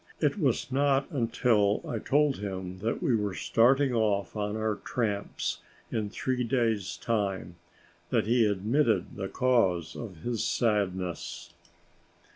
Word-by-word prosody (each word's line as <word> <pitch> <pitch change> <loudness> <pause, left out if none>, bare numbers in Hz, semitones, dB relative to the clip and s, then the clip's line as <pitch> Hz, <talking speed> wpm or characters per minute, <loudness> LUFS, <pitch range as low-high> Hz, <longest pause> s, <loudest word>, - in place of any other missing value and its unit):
It 150 +5 +1
was 135 -4 0
not 135 0 +2
until 115 -5 +2
I 115 - -2
told 145 +3 +2
him 95 -2 -5
that 115 +4 -2
we 125 - +3
were 105 -3 -1
starting 130 +3 +3
off 105 -4 0
on 105 0 -2
our 110 -1 -1
tramps 105 -4 -2 0.3
in 105 -2 -1
three 125 +3 -1
days' 115 -8 0
time, 95 -6 -2 0.5
that 115 -3 +2
he 115 0 +4
admitted 110 +6 +1
the 95 -1 -3
cause 95 -10 +1
of 95 -9 -8
his 120 -3 -1
sadness. 90 -5 -1
110 Hz, 130 wpm, -29 LUFS, 100-125 Hz, 0.5 s, he